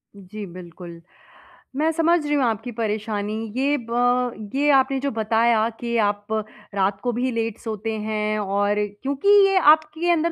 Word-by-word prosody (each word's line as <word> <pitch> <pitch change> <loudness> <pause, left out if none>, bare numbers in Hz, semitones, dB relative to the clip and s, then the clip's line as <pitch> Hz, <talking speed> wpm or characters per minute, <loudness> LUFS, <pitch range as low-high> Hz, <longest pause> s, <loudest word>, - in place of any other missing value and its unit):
जी, 200 +2 -9
बिल्कुल। 175 -1 -11 0.8
मैं 315 +2 +2
समझ 330 0 +2
रही 295 - -1
हूँ 280 - +2
आपकी 225 +1 -2
परेशानी। 215 -1 -2 0.2
ये 280 +2 +2
ब 245 -2 0
ये 290 +2 +2
आपने 270 0 +3
जो 280 0 -1
बताया 225 0 +2
कि 235 0 -2
आप 205 0 -6 0.5
रात 195 0 0
को 245 - 0
भी 250 +2 -1
लेट 225 -1 -2
सोते 220 -1 -4
हैं 215 0 -1
और 205 +1 0 0.2
क्योंकि 280 +8 0 0.2
ये 390 -1 +2 0.2
आपके 315 +2 -3
अंदर 335 0 +1
230 Hz, 155 wpm, -22 LUFS, 210-275 Hz, 0.8 s, आपने